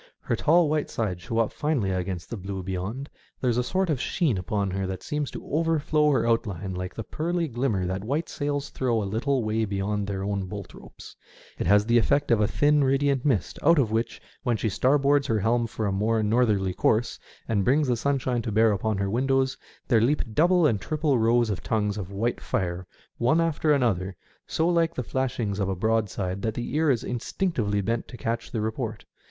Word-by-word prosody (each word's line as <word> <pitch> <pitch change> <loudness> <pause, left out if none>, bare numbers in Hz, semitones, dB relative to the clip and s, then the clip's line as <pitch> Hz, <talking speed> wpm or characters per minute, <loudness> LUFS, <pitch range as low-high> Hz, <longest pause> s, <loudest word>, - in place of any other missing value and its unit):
Her - - -1
tall 170 +1 +4
white 150 0 0
sides 95 -6 -2
show 115 +5 -4
up 115 -1 +2
finely 145 -11 0
against 90 -1 -3
the - - -2
blue 95 -1 -5
beyond. 95 +9 -4 0.3
There 125 - +1
is 120 - 0
a - - +1
sort 190 +8 0
of 145 -6 -1
sheen 155 - +1
upon 100 +1 -1
her 95 0 -2
that 95 0 -5
seems 150 -2 -2
to - - -8
overflow 155 -1 +2
her 125 -5 +2
outline 100 -5 -1
like 90 0 -5
the 115 - -4
pearly 170 - -2
glimmer 120 -7 -1
that 95 +2 -3
white 145 +9 -1
sails 145 -1 -3
throw 120 -4 0
a - - -3
little 120 +6 0
way 110 +1 0
beyond 100 0 -2
their 95 -1 -3
own 100 -1 -2
bolt 100 -1 -7
ropes; - - -13 0.4
it - - -1
has 105 +1 +5
the 120 +1 +4
effect 145 +4 +1
of 115 -2 +4
a 105 - +3
thin 145 +4 +3
radiant 135 0 +2
mist, 115 - 0
out 170 +2 +5
of 120 -7 +2
which, 115 +1 -1 0.2
when 120 -2 0
she 110 - -1
starboards 140 +4 +2
her 110 -1 +1
helm 115 +3 +1
for 110 0 -4
a 100 - 0
more 110 +3 +1
northerly 105 -4 +2
course 110 +5 +1 0.3
and 105 -3 +1
brings 140 +6 +3
the 125 - +2
sunshine 130 -1 0
to 115 - -4
bear 110 +1 +4
upon 105 +1 -1
her 100 0 -1
windows, 130 +4 +1 0.3
there 115 -4 +4
leap 140 +6 +2
double 175 +5 +4
and 110 -9 +2
triple 150 - 0
rows 115 0 +3
of 90 -4 -3
tongues 105 -2 0
of 100 -3 -6
white 115 +5 -1
fire 90 0 -2 0.3
one 130 +8 +3
after 160 -2 +1
another, 100 -9 +1 0.3
so 160 - 0
like 170 -1 +2
the 125 - -2
flashings 120 -5 -2
of 100 -1 0
a 95 - -1
broadside 100 -2 -1
that 110 +1 -2
the 120 - -4
ear 155 0 +3
is 125 -4 +2
instinctively 120 - -1
bent 115 +4 -2
to 120 - -10
catch 115 0 -3
the 115 - -3
report. 110 0 -3
115 Hz, 210 wpm, -26 LUFS, 100-140 Hz, 0.4 s, has